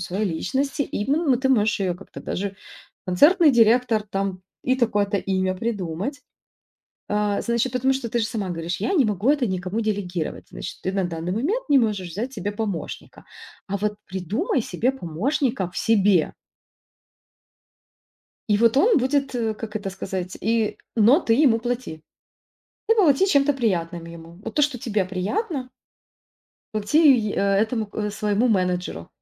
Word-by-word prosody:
своей 185 +4 -2
личности, 265 - -1
именно 275 +3 +1
ты 265 +2 0
можешь 215 -5 +2
ее 185 -2 0
как-то 185 +3 -11
даже 195 +1 -4 0.5
концертный 295 - +5
директор 230 -1 +4
там, 195 -2 -3 0.2
и 255 - +3
такое-то 210 -5 +1
имя 185 -1 0
придумать, 205 - -3 0.9
а. 210 -1 0
Значит, 235 +1 0
потому 260 +2 +2
что 260 -3 -3
ты 235 - -1
же 225 - +1
сама 210 -5 -3
говоришь: 170 +1 -4
"Я 220 - 0
не 285 -8 +4
могу 210 +5 +1
это 285 -5 +2
никому 185 +3 -2
делегировать". 195 -6 -3
Значит, - - -7
ты 190 - -2
на 195 -1 0
данный 170 0 -4
момент 330 - -1
не 280 -2 +6
можешь 205 -6 0
взять 230 +10 -4
себе 205 -4 -3
помощника, 205 -7 -5 0.4
а 200 - -1
вот 210 +1 -1
придумай 190 - -1
себе 225 +8 0
помощника 230 - -1
в - - -14
себе. 200 -6 +3 2.2
И 205 - +4
вот 230 +1 +4
он 395 - +5
будет, 275 +1 0
э, 225 -2 -1
как 215 0 -6
это 200 -2 -4
сказать, 185 -1 -5
и, 220 0 0 0.2
но 235 - +6
ты 225 -9 +2
ему 250 -5 +4
плати, 240 -10 -4 0.9
ты 450 - +4
плати 375 -3 +4
чем-то 285 -3 +3
приятным 175 -9 -1
ему. 170 +1 -12
Вот - - -6
то, 300 - +3
что 285 -3 +1
тебе 215 -7 -1
приятно 255 - -3 1.1
плати 215 +9 +1
й 255 -10 +5
этому, 215 +3 +1
э, 210 -1 -2
своему 210 +3 0
менеджеру. 180 - -1
215 Hz, 155 wpm, -23 LUFS, 190-255 Hz, 2.2 s, не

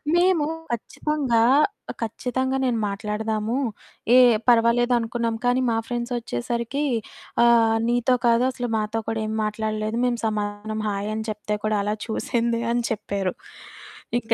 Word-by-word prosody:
మేము 350 -4 +3 0.3
ఖచ్చితంగా 255 +1 -1 0.5
ఆహ్, - - -11
ఖచ్చితంగా 260 +4 -2
నేను 235 -3 +1
మాట్లాడదాము, 215 +3 -2 0.6
ఏహ్! 245 -3 +7
పర్వాలేదు 240 +1 +4
అనుకున్నాం, 230 0 -2
కానీ 245 +1 +3
మా 225 - +1
ఫ్రెండ్సొచ్చేసరికీ 235 - -2 0.6
ఆహ్, 225 -1 +5
"నీతో 245 +1 +2
కాదు, 235 +1 +4
అసలు 245 -1 -4
మాతో 215 +1 -1
కూడా 225 -1 -1
ఏం 220 - -3
మాట్లాడలేదు. 215 +1 -2
మేము 240 -1 0
సమాధానం 210 0 -3
హాయని 210 +2 -3
చెప్తే 210 0 -3
కూడా 215 -1 +1
అలా 210 +1 -1
చూసింది" 230 +1 -1
అని 240 0 0
చెప్పారు. 200 -3 -2 0.9
ఇంక 230 -1 -1
230 Hz, 125 wpm, -24 LUFS, 215-240 Hz, 0.9 s, ఏహ్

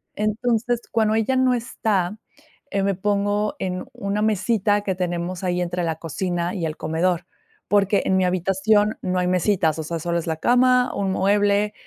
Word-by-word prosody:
Entonces, 230 +2 0
cuando 220 -1 +2
ella 225 +4 +1
no 260 -1 +3
está, 215 -5 -1 0.5
eh, 200 - 0
me 195 0 +1
pongo 205 +2 0
en 185 -1 -3
una 200 +1 -2
mesita 210 0 +1
que 195 -2 -2
tenemos 175 0 -3
ahí 180 -1 0
entre 175 0 -2
la 160 -1 -2
cocina 175 +2 -3
y 175 -4 -2
el 155 0 -4
comedor, 170 +3 0 0.4
porque 200 0 +2
en 190 - +2
mi 185 - +2
habitación 195 +4 +2
no 185 0 -1
hay 180 - 0
mesitas, 180 -3 +1
o - - -2
sea, 165 +1 -4
solo 170 +2 -1
es 170 - -7
la 160 -1 -1
cama, 250 +3 +3
un 195 -1 -1
mueble, 205 +2 +2
195 Hz, 175 wpm, -22 LUFS, 180-210 Hz, 0.5 s, no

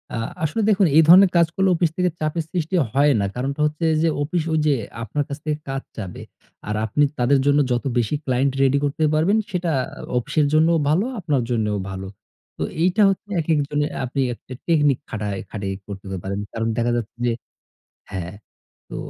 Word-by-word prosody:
আ - - -2 0.3
আসলে 160 +9 0
দেখুন 200 -3 +4
এই - - +9
ধরনের 185 +3 +8
কাজ 170 -1 +5
করলে 190 0 +2
অফিস 170 0 +2
থেকে 180 0 +2
চাপের 155 +1 -1
সৃষ্টি 175 0 -2 0.2
হয় 145 +2 +4
না। 100 - +1
কারণটা 140 +4 -3
হচ্ছে 155 +2 -1 0.2
যে 165 - +3
অফিস 165 +2 -1
ওই 160 - +2
যে 145 - +4 0.3
আপনার 145 +7 -1
কাছ 140 - -4
থেকে 150 -1 -1
কাজ 135 0 -2 0.2
চাবে 95 -5 -6 0.5
আর 105 - -1
আপনি 145 +7 +1 0.2
তাদের 135 +3 +3
জন্য 145 +1 +4
যতো 120 +3 0
বেশি 120 +4 +1
ক্লায়েন্ট 130 +1 +1
রেডি 135 +1 +4
করতে 145 +2 -1
পারবেন 170 +8 +3
সেটা 175 -2 -1
আ - - -10 0.2
অফিসের 145 +4 +1
জন্যও 160 +2 +4
ভালো, 175 +9 +2
আপনার 150 -7 0
জন্যও 105 -3 0
ভালো। 95 0 -6 0.5
তো - - -2 0.2
এইটা 185 +4 +3
হচ্ছে 195 +2 -3
একেক 155 -1 +1
জনের 145 0 -1
আপনি 135 +2 -2
একটা 125 - -11
টেকনিক 145 -5 +3
খাটায় 105 -3 -3
খাটাই 100 -3 -3
করতে 100 -1 -8 0.2
পারেন। 100 +1 -3
কারণ 115 0 -2
দেখা 120 0 +1
যাচ্ছে 115 -3 -5
যে 120 - +2 0.8
হ্যাঁ, 90 -1 -5 0.6
তো - - -7
145 Hz, 190 wpm, -22 LUFS, 120-165 Hz, 0.8 s, এই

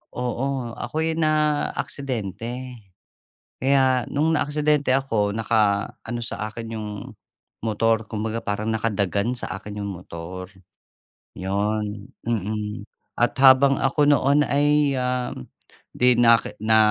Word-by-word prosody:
Oo, 125 0 -2
ako'y 160 +6 -2
naaksidente. 130 - -1 0.8
Kaya 130 -2 +3
'nung 155 +3 +1
naaksidente 150 -3 +2
ako, 110 -6 0
naka-ano 110 +1 0
sa 110 -2 -4
akin 115 +1 -7
'yung 105 -1 -5 0.7
motor 110 0 +1
kumbaga, 110 +1 -3
parang 105 +1 -2
nakadagan 110 +1 0
sa - - -5
akin 105 0 -7
'yung 100 - -3
motor. 90 +1 -8 0.9
'Yon, 105 +2 -2
mm. 105 -1 -3 0.3
At 120 0 +2
habang 135 +1 +6
ako 140 +2 +2
noon 145 +1 +4
ay, 145 0 +3
ah, 125 -1 -1 0.6
'di 125 0 +5
naki 115 -1 +4
na 110 0 +4
115 Hz, 105 wpm, -23 LUFS, 105-135 Hz, 0.9 s, habang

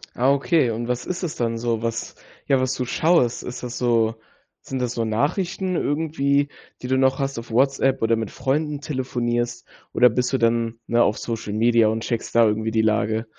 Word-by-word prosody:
Ah, 130 +3 +2
okay. 140 -3 +2
Und 115 +2 -4
was 125 0 -2
ist 180 0 -4
das 165 - -3
dann 115 -1 -1
so? 115 -1 -1
Was 115 -1 -3 0.3
ja, 135 -1 +3
was 130 0 0
du 130 - -2
schaust, 155 -3 +2
ist 125 - -7
das 120 -1 -5
so 115 -2 +2 0.5
sind 130 -1 -4
das 125 -1 -1
so 115 -1 -1
Nachrichten 175 - -1
irgendwie, 145 -2 0 0.3
die - - -3
du 130 - +1
noch 130 0 +3
hast 135 -3 -2
auf 115 - -10
WhatsApp 135 +2 +2
oder 115 0 +3
mit 110 -3 -3
Freunden 145 +2 -2
telefonierst? 120 -4 -2 0.3
Oder 125 0 +6
bist 125 +3 -1
du - - +3
dann, 115 -1 +1
ne, 120 +1 +3
auf 105 +1 +2
Social 115 -3 -4
Media 115 0 +4
und 110 +1 -1
checkst 115 0 -3
da 115 -1 +6
irgendwie 110 +1 0
die 110 0 +2
Lage? 110 +1 +1
120 Hz, 200 wpm, -23 LUFS, 115-135 Hz, 0.5 s, Oder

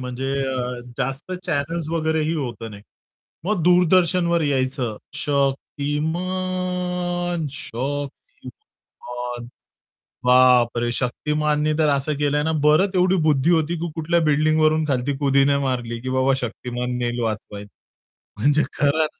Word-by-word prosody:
म्हणजे 130 +2 -3 0.2
अ, 125 -1 -3 0.2
जास्त 135 +7 -3
चॅनल्स 160 +1 -2
वगैरेही 160 -1 0
होतं 120 -7 -4
नाही. 100 -1 -11 0.6
मग 195 -2 0
दूरदर्शनवर 175 -1 +3
यायचं 130 -5 -1 0.2
शतिमान, 175 +5 -2
शक्तिमान 130 - -7 0.8
बापरे, 125 -1 +4
शक्तिमाननी 150 +5 0
तर 155 -1 +4
असं 140 +1 0
केलंय 145 0 +1
ना 160 - 0
बरं 155 +6 +5
एवढी 185 +1 +3
बुद्धी 150 0 +3
होती 165 0 +2
की 170 - -2
कुठल्या 165 +2 +1
बिल्डिंगवरून 155 +1 +3
खालती 135 0 0
कुदि 140 -1 +3
नाही 140 0 +2
मारली 120 -3 -2
की 130 - -4
बाबा 130 +1 +2
शक्तिमान 125 0 -4
नेईल 120 0 -2
वाचवायला. 105 -2 -4 0.7
म्हणजे 145 +6 +3
खरं. 150 +2 +2
145 Hz, 115 wpm, -22 LUFS, 125-160 Hz, 0.8 s, बरं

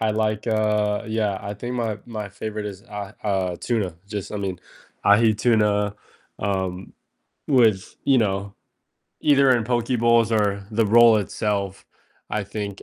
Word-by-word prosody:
I 110 -1 +1
like, 110 0 -1
uh 105 -1 +1
yeah, 110 -3 -1
I 100 +1 -5
think 120 +4 -5
my 110 -3 -2
my 105 -3 -5
favorite 105 +1 -5
is, 100 -1 -8
uh 105 -1 -7
uh, 95 -4 -1
tuna, 105 -8 -1
just 105 -2 -5
I 105 - -3
mean, 95 -3 -3 0.5
ahi 110 +1 +5
tuna, 105 -3 +2 0.4
um, 95 -2 -3 0.6
with, 115 -9 +3
you 135 -2 +4
know 100 -1 -1 0.7
either 140 -2 +5
in 120 -3 +3
poke 120 0 0
bowls 115 -1 +4
or 100 -2 0
the 110 +1 +2
roll 115 +1 +7
itself, 100 -1 -2 0.5
I 105 -1 -1
think, 100 -1 -6
105 Hz, 150 wpm, -23 LUFS, 100-115 Hz, 0.7 s, roll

